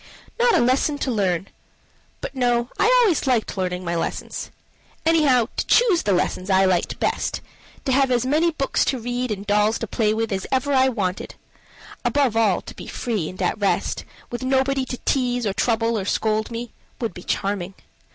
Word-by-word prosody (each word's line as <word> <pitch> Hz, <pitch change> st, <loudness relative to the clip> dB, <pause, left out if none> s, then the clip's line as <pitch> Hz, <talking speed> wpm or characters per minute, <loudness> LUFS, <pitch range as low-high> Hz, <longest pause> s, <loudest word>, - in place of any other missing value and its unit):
Not 480 Hz, -1 st, +4 dB
a -, -, +3 dB
lesson 260 Hz, +4 st, +2 dB
to 270 Hz, -, -2 dB
learn 190 Hz, -4 st, 0 dB, 0.7 s
but -, -, -5 dB
no! 245 Hz, -2 st, +1 dB
I -, -, +4 dB, 0.2 s
always 350 Hz, -10 st, +1 dB
liked 245 Hz, -4 st, +1 dB
learning 180 Hz, -1 st, -2 dB
my 170 Hz, -, -1 dB
lessons. 165 Hz, -, -4 dB, 0.6 s
Anyhow, 280 Hz, -8 st, +4 dB
to -, -, -2 dB
choose 435 Hz, -8 st, +4 dB
the 205 Hz, -, 0 dB
lessons 185 Hz, +1 st, 0 dB
I 190 Hz, 0 st, +4 dB
liked 185 Hz, -2 st, 0 dB
best, -, -, -1 dB, 0.5 s
to 265 Hz, -, 0 dB
have 270 Hz, +1 st, +3 dB
as 245 Hz, -1 st, +1 dB
many 310 Hz, +6 st, +3 dB
books 275 Hz, -4 st, 0 dB
to 260 Hz, -, 0 dB
read 245 Hz, +2 st, -2 dB
and 205 Hz, -2 st, -4 dB
dolls 210 Hz, +2 st, +2 dB
to -, -, -4 dB
play 215 Hz, 0 st, 0 dB
with 225 Hz, 0 st, -1 dB
as 190 Hz, -1 st, -2 dB
ever 275 Hz, +2 st, +1 dB
I 265 Hz, 0 st, +4 dB
wanted: 195 Hz, -6 st, -3 dB, 0.7 s
above 275 Hz, -6 st, +1 dB
all, 215 Hz, -5 st, +3 dB
to -, -, -10 dB
be -, -, -9 dB
free 215 Hz, -10 st, -2 dB
and 185 Hz, -, -11 dB
at 180 Hz, -, 0 dB
rest, 200 Hz, -2 st, 0 dB, 0.3 s
with 240 Hz, -, -4 dB
nobody 265 Hz, +1 st, +1 dB
to 250 Hz, -, -5 dB
tease 245 Hz, -3 st, +1 dB
or 200 Hz, -, 0 dB
trouble 225 Hz, 0 st, +1 dB
or 190 Hz, -, -4 dB
scold 215 Hz, +1 st, 0 dB
me, 235 Hz, 0 st, -6 dB, 0.3 s
would 230 Hz, -6 st, -2 dB
be 180 Hz, -, -9 dB
charming. 195 Hz, 0 st, -2 dB
235 Hz, 190 wpm, -22 LUFS, 200-265 Hz, 0.7 s, Not